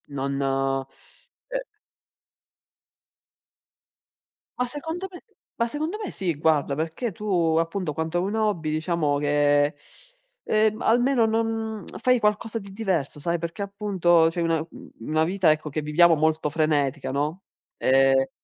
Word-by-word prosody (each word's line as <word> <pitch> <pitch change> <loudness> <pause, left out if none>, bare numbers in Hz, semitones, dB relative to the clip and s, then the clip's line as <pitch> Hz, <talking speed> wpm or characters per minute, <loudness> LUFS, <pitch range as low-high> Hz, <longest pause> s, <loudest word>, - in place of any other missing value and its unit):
Non, 140 -1 -3 0.4
eh - - -10 3.0
Ma 250 - +2
secondo 320 +8 -5
me 355 - -11 0.4
ma 235 - +3
secondo 310 - -3
me - - -4
sì, 180 -5 -2
guarda, 150 -2 +2
perché 160 - -3
tu 175 -5 0
appunto 165 -1 -2
quando 160 +2 -2
hai 175 - +1
un 200 +2 -2
hobby 210 -8 0
diciamo 155 -2 0
che, 145 0 +2 0.7
ehm, 215 +1 +1
almeno 245 +1 +3
non 225 -1 -1 0.2
fai 250 +1 +3
qualcosa 210 +1 0
di 200 -3 -8
diverso, 190 -9 -2
sai. 170 +3 -1
Perché 170 +4 -5
appunto 195 -5 +2
c'hai 170 +1 -3
una 165 -1 +1
u 160 +2 -10
una 155 +6 +1
vita 180 -1 +3
ecco 155 0 -1
che 155 +2 -3
viviamo 165 +3 +5
molto 155 0 +1
frenetica, 145 -3 0
no. 150 +7 -2 0.3
Ehm 135 0 +3
170 Hz, 135 wpm, -25 LUFS, 150-215 Hz, 3.0 s, viviamo